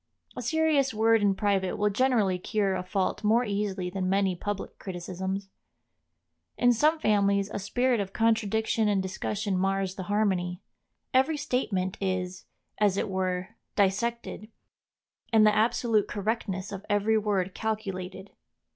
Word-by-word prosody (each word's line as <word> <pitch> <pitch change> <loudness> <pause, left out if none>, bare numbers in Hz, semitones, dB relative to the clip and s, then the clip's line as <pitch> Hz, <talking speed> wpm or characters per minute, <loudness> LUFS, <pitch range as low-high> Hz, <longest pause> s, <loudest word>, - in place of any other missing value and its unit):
A - - -4
serious 315 -6 +2
word 225 0 +4
in 200 -1 +3
private 195 -2 0
will 210 0 +2
generally 210 -5 +2
cure 200 +1 0
a 185 - -1
fault 185 +3 -2
more 225 +4 +3
easily 200 -3 -2
than 185 -1 -2
many 195 -1 +2
public 205 +2 -5
criticisms. 190 +1 -5 1.1
In 245 0 +4
some 305 +7 +3
families 200 -5 +2
a - - -3
spirit 245 +4 +1
of 195 -1 -3
contradiction 220 0 +1
and 205 -2 +2
discussion 195 +2 -2
mars 195 0 0
the 190 - -6
harmony; 190 -4 0 0.5
every 265 +4 +3
statement 200 -10 -1
is, 185 -1 -2 0.3
as 205 -2 +3
it - - -1
were, 185 0 -1 0.3
dissected, 215 +2 0 0.8
and 220 -2 +6
the 210 0 +4
absolute 225 -1 +2
correctness 205 -2 -3
of 200 -1 -6
every 210 +2 +2
word 195 -3 -1
calculated. 195 -3 -4
205 Hz, 140 wpm, -28 LUFS, 190-220 Hz, 1.1 s, and